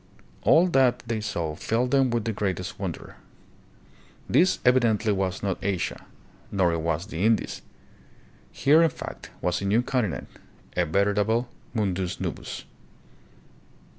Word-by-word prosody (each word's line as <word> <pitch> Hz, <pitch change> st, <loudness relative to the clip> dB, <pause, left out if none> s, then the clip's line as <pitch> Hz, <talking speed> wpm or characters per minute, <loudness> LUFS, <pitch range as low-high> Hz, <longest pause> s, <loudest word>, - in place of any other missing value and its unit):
All 165 Hz, +3 st, +5 dB
that 125 Hz, -4 st, +3 dB
they 115 Hz, -2 st, -2 dB
saw 85 Hz, -8 st, -3 dB
filled 120 Hz, +8 st, 0 dB
them 135 Hz, -2 st, +4 dB
with 115 Hz, -2 st, -1 dB
greatest 95 Hz, -3 st, -3 dB
wonder. -, -, -6 dB, 1.1 s
This 185 Hz, +2 st, +4 dB
evidently 115 Hz, -4 st, +3 dB
was 95 Hz, 0 st, -2 dB
not 95 Hz, -2 st, -2 dB
Asia, 95 Hz, -2 st, -2 dB, 0.4 s
nor 90 Hz, -4 st, +2 dB
was 80 Hz, +2 st, -1 dB
it -, -, -17 dB
the 85 Hz, +4 st, -2 dB
Indies. 110 Hz, 0 st, +1 dB, 0.9 s
Here, 150 Hz, +4 st, +4 dB
in 165 Hz, -, +5 dB
fact, -, -, -8 dB
was 90 Hz, +1 st, 0 dB
a -, -, -3 dB
new 110 Hz, +5 st, +3 dB
continent, 125 Hz, -8 st, -1 dB, 0.5 s
a 90 Hz, -1 st, +1 dB
veritable 105 Hz, +6 st, +1 dB
" -, -, -30 dB
Mundus 95 Hz, -4 st, -1 dB
Novus." -, -, -5 dB
105 Hz, 135 wpm, -26 LUFS, 95-120 Hz, 1.1 s, All